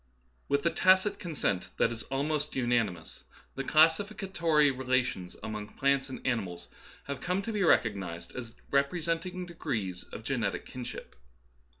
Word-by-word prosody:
With 140 +1 +1
a 170 - +4
tacit 185 +2 +4
consent 150 - -1
that 115 - +3
is 115 -1 -4
almost 150 +2 -1
unanimous, 115 -10 0 0.3
the 135 - -3
classificatory 165 -1 +3
relations 130 -8 -1
among 105 -1 -5
plants 140 0 +2
and 130 - -8
animals 100 -9 -2 0.3
have 140 -1 -5
come 185 +2 0
to 225 - -3
be 210 - 0
recognized 100 - +1
as 120 -3 -6 0.2
representing 165 +5 0
degrees 105 - -3
of 110 - -9
genetic 115 -5 -1
kinship. 125 -1 -7
135 Hz, 130 wpm, -30 LUFS, 115-165 Hz, 0.3 s, a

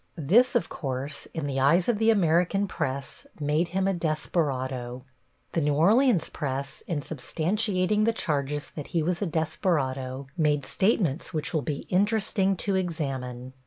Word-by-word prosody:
This, 220 - +4
of 240 - +2
course, 135 -1 -4
in 160 -3 -4
the 135 -1 -1
eyes 170 +7 +4
of 230 -4 +1
the 225 0 +4
American 180 0 +3
press, 140 -7 -4
made 150 +3 +1
him 190 +2 0
a 195 - +2
desperado. 130 -6 -2 0.5
The 165 - 0
New 145 -1 +1
Orleans 210 - +4
press, 135 -1 -4
in 160 -4 -1
substantiating 185 - 0
the 230 - +4
charges 145 -7 -2
that 150 - -7
he 160 - +2
was 175 +1 -1
a 200 - 0
desperado, 140 -5 -1
make 150 -4 +1
statements 180 - 0
which 155 - -2
will 155 - +1
be 145 -1 -4
interesting 195 0 +2
to 200 - +1
examine. 135 -8 -3
160 Hz, 155 wpm, -27 LUFS, 140-190 Hz, 0.5 s, This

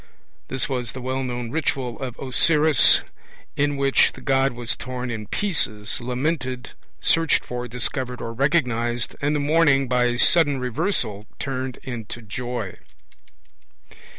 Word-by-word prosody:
(1) - - -28 0.4
This 130 - -1
was 125 -4 -3
the 130 - -7
well 130 +1 -2
known 120 -2 -4
ritual 135 -6 -2
of 125 -3 -5
Osiris, 150 +3 +5 0.5
in 145 0 0
which 140 0 +3
the - - -12
god 135 -1 +2
was 120 -1 -3
torn 125 0 -5
in 110 -2 -5
pieces, 110 - -1
lamented, 130 0 -2 0.3
searched 165 -2 +2
for, 125 0 -5
discovered 125 +1 -1
or 115 - -5
recognized, 120 -4 +1
and 145 +1 +1
the - - +1
mourning 145 -2 +3
by 125 0 +2
a 120 0 0
sudden 145 -1 +5
Reversal 125 - -1
turned 130 -2 -4
into 120 -2 -6
joy. 115 -2 -5
130 Hz, 140 wpm, -23 LUFS, 120-140 Hz, 0.5 s, Osiris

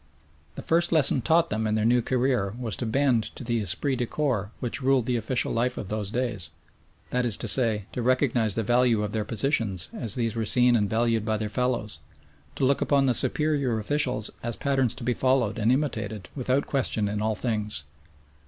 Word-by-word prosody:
The - - -7
first 170 +1 +1
lesson 150 -5 +4
taught 165 +4 +2
them 110 0 -1
in 105 - 0
their 110 0 0
new 120 +1 +3
career 125 -5 0
was 120 -4 -4
to 120 - -3
bend 125 -1 +1
to - - -6
the 120 -1 -1
esprit 105 - +1
de 120 -1 -2
corps 120 -10 -1
which 125 +4 -3
ruled 130 -2 +2
the 125 - -1
official 120 +2 -1
life 125 +2 -1
of 100 - -6
those 105 -2 -3
days, 115 -8 -3 0.6
that 125 0 0
is 120 -4 +1
to - - -3
say, 110 -6 +3
to 125 - -4
recognise 125 -4 +1
the 115 - -1
value 120 -1 +2
of 105 - -3
their 110 -1 -2
positions 105 - 0
as 110 -4 -1
these 115 -3 -1
were 115 - -1
seen 125 +2 +5
and 105 -3 +1
valued 115 -1 +1
by 110 0 -1
their 105 0 -4
fellows, 120 -2 -2 0.6
to 135 - 0
look 140 +1 +1
upon 140 -1 +2
the 130 - +2
superior 140 -3 +1
officials 125 -1 0
as 120 -1 -3
patterns 135 -4 0
to 125 - -9
be 125 +1 0
followed 130 -4 0
and 110 +2 +2
imitated 110 -8 -2
without 130 +1 0
question 115 -6 -1
in 105 +1 -3
all 110 0 0
things. 105 - -2
120 Hz, 205 wpm, -26 LUFS, 110-130 Hz, 0.6 s, seen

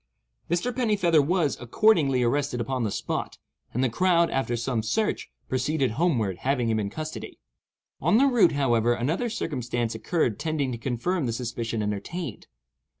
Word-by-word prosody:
Mr. 175 +9 0
Pennifeather 200 - +3
was, 155 -1 +1
accordingly, 135 - +3
arrested 125 +1 0
upon 130 +2 -2
the 110 - 0
spot, - - -3 0.3
and 125 - 0
the - - +4
crowd, 170 +6 +3
after 130 -3 0
some 120 0 -1
further 110 - -4
search, 215 - 0 0.2
proceeded 130 0 0
homeward, 115 - 0
having 130 0 0
him 110 -1 +1
in 100 -1 -2
custody. 155 +6 -6 0.6
On 215 - +4
the 270 - +5
route, 235 - +4
however, 120 -4 +2
another 160 - -1
circumstance 120 - -2
occurred 115 - -1
tending 155 -5 -1
to 120 - -5
confirm 135 +6 -1
the - - 0
suspicion 115 -2 -3
entertained. 110 - -4
135 Hz, 155 wpm, -26 LUFS, 120-170 Hz, 0.6 s, the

